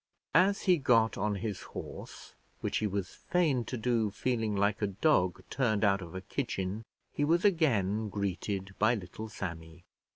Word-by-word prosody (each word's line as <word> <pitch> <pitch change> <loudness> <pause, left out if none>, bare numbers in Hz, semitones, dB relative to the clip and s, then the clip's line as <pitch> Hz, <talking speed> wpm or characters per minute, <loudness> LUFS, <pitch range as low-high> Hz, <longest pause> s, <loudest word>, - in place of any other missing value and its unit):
As 190 +5 +4
he 180 -2 +5
got 115 -5 +3
on 105 +1 0
his 100 0 -4
horse, - - -9 0.3
which - - -1
he 110 - 0
was 100 -2 -3
fain 155 -9 +1
to 125 - -4
do 115 -2 +1
feeling 110 0 -1
like 100 +2 +1
a 105 - +2
dog 95 - +2
turned 110 -6 +1
out 100 -1 +3
of 85 0 -9
a 95 - -4
kitchen, 100 -4 -3 0.3
he 145 - 0
was 170 +6 +3
again 110 - +2
greeted 100 0 -3
by 110 +3 +4
little 105 +2 -7
Sammy. 85 -4 -7
105 Hz, 165 wpm, -31 LUFS, 95-125 Hz, 0.3 s, he